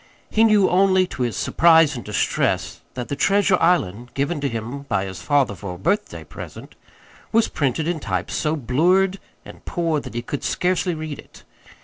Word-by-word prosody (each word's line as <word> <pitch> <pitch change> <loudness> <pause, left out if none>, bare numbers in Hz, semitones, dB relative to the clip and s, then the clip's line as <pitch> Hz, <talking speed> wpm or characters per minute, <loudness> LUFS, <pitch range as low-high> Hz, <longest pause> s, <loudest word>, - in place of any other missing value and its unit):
He 220 - +3
knew 210 -3 +5
only, 190 0 +3
to 155 - -8
his 120 -5 -1
surprise 165 -3 +4
and 120 - -6
distress, 105 -1 -1 0.2
that 125 -2 -4
the 140 - -3
"Treasure 195 +3 +3
Island," 120 - +1
given 145 +3 -1
to 140 - 0
him 115 +4 -5
by 100 -2 0
his 95 -1 -7
father 140 -6 +2
for 95 -1 -7
a - - -10
birthday 155 - -1
present, - - -10 0.6
was 225 0 +3
printed 145 +2 -1
in 175 -2 -1
type 95 - -3
so 155 0 0
blurred 180 - +2 0.3
and - - -13
poor 165 -3 -1
that 115 - -10
he 120 - -3
could 140 +3 -5
scarcely 180 -1 0
read 155 -2 -6
it. - - -15
150 Hz, 185 wpm, -22 LUFS, 120-180 Hz, 0.6 s, knew